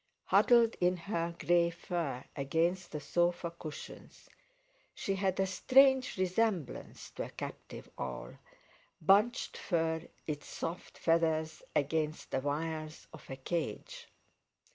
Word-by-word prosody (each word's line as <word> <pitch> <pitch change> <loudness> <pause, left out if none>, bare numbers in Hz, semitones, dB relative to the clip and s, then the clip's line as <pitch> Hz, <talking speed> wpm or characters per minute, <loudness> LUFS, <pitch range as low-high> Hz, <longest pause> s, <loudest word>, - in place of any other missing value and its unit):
Huddled 235 -2 +5
in 180 +1 +3
her 170 -1 -2
grey 175 -1 +3
fur 165 -6 -3
against 165 +6 0
the 150 - -3
sofa 175 +3 0
cushions, 160 -3 -10 0.6
she 195 - -1
had 190 -1 0
a 190 - +4
strange 260 +7 +4
resemblance 185 - -1
to - - -4
a - - -8
captive - - -8
owl, 65 -2 -5 0.7
bunched 205 +9 +3
in 160 -1 +1 0.2
its 150 -2 -4
soft 170 +2 -5
feathers 160 -1 +1
against 155 +1 0
the - - +1
wires 155 +2 -3
of - - -12
a 135 - -4
cage. 180 - -4
170 Hz, 120 wpm, -33 LUFS, 155-190 Hz, 0.7 s, Huddled